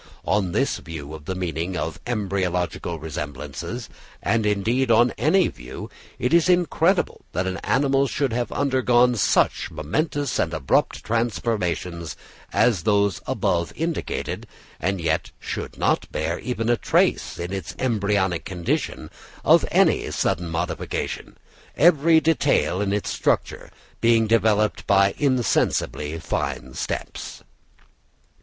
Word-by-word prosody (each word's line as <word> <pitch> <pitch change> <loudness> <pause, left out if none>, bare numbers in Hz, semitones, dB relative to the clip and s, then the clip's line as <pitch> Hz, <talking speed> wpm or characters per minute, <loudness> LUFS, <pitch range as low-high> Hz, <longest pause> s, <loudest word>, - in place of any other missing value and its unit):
On 95 -3 +1
this 135 +9 0
view 80 -3 -8
of 75 -2 -9
the 95 - -3
meaning 90 0 -3
of 80 -2 -3
embryological 95 -6 -1
resemblances, 75 - -6 0.3
and 110 -2 +1
indeed 115 +6 +1
on 120 +2 +5
any 185 +4 +3
view, - - -8 0.3
it 125 - 0
is 170 +1 +5
incredible 175 +1 +2
that 90 +3 0
an 95 0 -2
animal 135 +3 +2
should 135 -2 -1
have 120 0 -1
undergone 125 -3 +3
such 105 - +2
momentous 145 - -2
and - - 0
abrupt 65 - +1
transformations 90 -8 -2 0.3
as 110 -9 +3
those 100 +1 +2
above 85 -3 0
indicated, 165 +1 -3 0.3
and 95 +2 -1
yet 85 - 0
should - - -5
not - - 0
bear 80 +2 -2
even 115 -3 -3
a 120 0 +3
trace - - +1
in 90 +2 -4
its 95 -4 -5
embryonic 100 -7 0
condition 90 -3 -3 0.3
of - - +6
any - - +3
sudden 85 0 -1
modification, 80 0 -3 0.4
every 160 0 +5
detail 145 - +2
in 100 -1 0
its 105 0 -1
structure - - -1 0.3
being 115 -1 +4
developed 110 -1 +2
by 100 -1 +4
insensibly 80 - +1
fine 65 -4 -3
steps. - - -5
105 Hz, 125 wpm, -23 LUFS, 85-125 Hz, 0.4 s, of